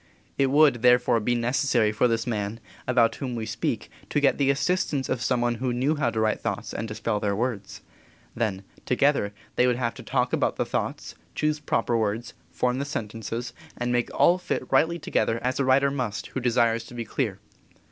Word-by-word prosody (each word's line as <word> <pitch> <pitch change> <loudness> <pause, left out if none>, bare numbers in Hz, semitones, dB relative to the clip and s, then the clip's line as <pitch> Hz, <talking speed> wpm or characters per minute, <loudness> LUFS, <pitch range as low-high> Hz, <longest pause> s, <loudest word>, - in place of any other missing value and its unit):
It 135 -1 +2
would, 140 -4 +4
therefore, 125 -1 +4
be 120 +3 0
necessary 120 -2 +2
for 110 +4 +2
this 115 -1 0
man, 110 -2 -2 0.3
about 120 -2 +3
whom 125 -3 -4
we 115 -1 -3
speak, - - -3 0.2
to - - +1
get 145 0 +2
the 140 -1 +3
assistance 145 -1 0
of 120 - -1
some 125 -1 +1
one 120 0 +2
who 130 -1 0
knew 130 +5 +1
how 145 -5 +1
to 115 - -2
write 110 -1 +1
thoughts - - -3
and 115 - -3
to 110 - -6
spell 105 -2 -1
their 100 -1 0
words. 110 -3 -3 0.5
Then, 105 -5 -2 0.2
together, 130 -5 +2 0.3
they 125 - +4
would 125 - +2
have 120 -1 -1
to - - -10
talk - - 0
about - - +1
the - - -1
thoughts, - - -3 0.2
choose 155 0 0
proper 120 -4 0
words, 110 +1 -1 0.2
form 125 +1 0
the 140 - -2
sentences, 115 -2 -4 0.2
and 120 0 -1
make 120 -1 +1
all 180 +2 +4
fit - - -2
rightly 170 +2 +3
together 115 -7 0
as 125 +1 -1
a 140 - +2
writer 135 +1 +4
must 125 -7 -3
who - - -3
desires 115 -2 +2
to 125 - -12
be 120 -1 -4
clear. 110 -4 -2
120 Hz, 205 wpm, -26 LUFS, 115-135 Hz, 0.5 s, would